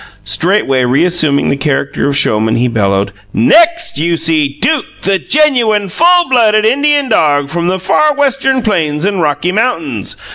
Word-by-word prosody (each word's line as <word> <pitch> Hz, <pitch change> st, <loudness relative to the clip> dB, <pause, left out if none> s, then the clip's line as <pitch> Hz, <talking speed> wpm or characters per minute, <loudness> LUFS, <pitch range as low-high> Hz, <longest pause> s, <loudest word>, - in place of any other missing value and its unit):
Straightway 135 Hz, -, 0 dB
reassuming 150 Hz, +2 st, +1 dB
the -, -, 0 dB
character 140 Hz, -1 st, -2 dB
of 140 Hz, -1 st, 0 dB
showman, 110 Hz, -4 st, +1 dB
he 120 Hz, +1 st, 0 dB
bellowed: 100 Hz, -4 st, -1 dB, 0.2 s
"NEXT, 335 Hz, -, +2 dB
you 170 Hz, +1 st, 0 dB
see 155 Hz, -3 st, -1 dB
Duke, 315 Hz, -4 st, 0 dB, 0.2 s
the 195 Hz, 0 st, 0 dB
genuine, 235 Hz, -10 st, +1 dB
full 350 Hz, -, +2 dB
blooded 215 Hz, -4 st, +2 dB
Indian 285 Hz, +4 st, +1 dB
dog 145 Hz, -, +1 dB
from 170 Hz, +1 st, -2 dB
the 185 Hz, +1 st, -1 dB
far 295 Hz, +11 st, +1 dB
Western 270 Hz, -2 st, 0 dB
Plains 160 Hz, -7 st, -1 dB
and 200 Hz, -3 st, -1 dB
Rocky 150 Hz, +3 st, -1 dB
Mountains. 165 Hz, -, -3 dB
175 Hz, 150 wpm, -12 LUFS, -, 0.2 s, NEXT